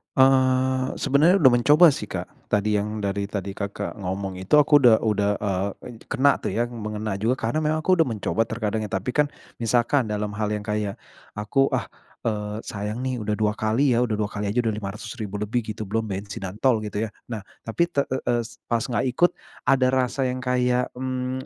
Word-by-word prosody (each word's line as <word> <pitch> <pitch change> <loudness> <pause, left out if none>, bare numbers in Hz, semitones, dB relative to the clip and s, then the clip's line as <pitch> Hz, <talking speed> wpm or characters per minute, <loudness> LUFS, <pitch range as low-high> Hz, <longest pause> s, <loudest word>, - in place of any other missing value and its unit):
Eee, 130 -1 +3
sebenarnya 155 +7 +4
udah 130 - +7
mencoba 150 +7 +6
sih, - - -5
Kak, - - -7
tadi 105 +1 +1
yang 105 +1 -3
dari 100 0 -1
tadi 100 -1 -4
Kakak 100 0 -4
ngomong 95 0 -4
itu 95 +11 +2
aku 145 0 +6
udah 115 -3 +7
udah, 105 -2 +2
eee, 100 -1 -1 0.3
ed - - -28
kena 140 0 +3
tuh - - -3
ya, 120 - +1
mengena 105 -2 -4
juga 115 +5 +1
karena 115 +7 -1
memang 155 +1 0
aku 185 -2 +3
udah 160 - +2
mencoba 110 -1 -1
terkadang 110 -1 -2
ya, - - -7
tapi 95 +7 -2
kan 150 -1 +3 0.3
misalkan 120 +2 +2
dalam 105 0 -2
hal 105 -1 0
yang 105 - -3
kayak 105 -2 -2 0.4
aku, 135 +6 +2
ah, 115 -7 -1 0.4
eee, 105 -1 -2
sayang 105 +4 -4
nih 130 -2 -2
udah 105 0 -1
2 105 -1 +1
kali 115 +5 +1
ya, 115 - +3
udah 110 - -1
2 105 - 0
kali 100 0 -3
aja 105 - -3
udah 110 - +1
lima 105 -2 -4
ratus 105 - -8
ribu 105 -1 -5
lebih 105 +4 -1
gitu, 110 - -5
belum 110 +3 -2
bensin 100 0 -5
dan 95 +1 -6
tol 125 -5 +4
gitu 105 -1 -5
ya. - - -7 0.2
Nah, 110 -3 -5 0.2
tapi 170 +10 +2
te 140 - +2
e 130 - 0 0.2
es 115 - -10
pas 115 -1 0
nggak 125 +1 -1
ikut 175 +7 +4 0.4
ada 130 -2 +4
rasa 130 +1 +1
yang 130 0 -2
kayak, 125 0 +1
mmm, 130 0 -3
115 Hz, 210 wpm, -24 LUFS, 105-130 Hz, 0.4 s, udah